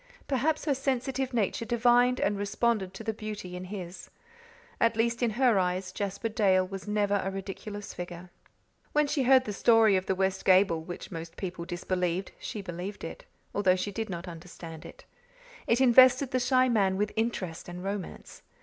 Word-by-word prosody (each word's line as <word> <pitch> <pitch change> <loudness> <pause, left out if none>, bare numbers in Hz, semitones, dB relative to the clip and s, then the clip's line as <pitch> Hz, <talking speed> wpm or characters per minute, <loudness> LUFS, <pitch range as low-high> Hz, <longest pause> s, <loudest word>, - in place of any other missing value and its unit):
Perhaps 290 +4 0
her 295 - +2
sensitive 265 0 -1
nature 230 -2 0
divined 245 +1 +3
and 205 - +1
responded 205 0 0
to 225 - -7
the 220 0 -2
beauty 210 -4 -6
in 180 +1 -6
his. 185 -2 -8 0.7
At 230 -1 +3
least, 235 +1 +1
in 240 - +3
her 245 -6 +4
eyes 185 0 -1
Jasper 200 +3 -3
Dale 195 -4 +3
was 195 +1 -7
never 205 -1 +1
a 195 - -1
ridiculous 200 +2 -6
figure. 175 0 -8 0.6
When 300 0 +4
she 285 0 0
heard 260 0 +5
the 210 - -4
story 225 -1 +5
of 185 0 -1
the 190 - +1
west 190 0 0
gable, 185 -3 +4
which 175 +2 -8
most 165 -1 -7
people 180 -3 -5
disbelieved, 180 +1 -2
she 210 - -6
believed 180 +2 -6
it, - - -7 0.3
although 190 -3 +3
she 185 +2 -3
did 225 +1 -4
not 175 0 -5
understand 165 -1 -9
it. - - -14 0.6
It 235 - +3
invested 260 +1 +6
the 255 - +1
shy 255 +1 +3
man 195 -6 +2
with 210 +1 0
interest 200 -8 -2
and 175 +1 -7
romance. 195 -2 -6
205 Hz, 175 wpm, -29 LUFS, 185-235 Hz, 0.7 s, invested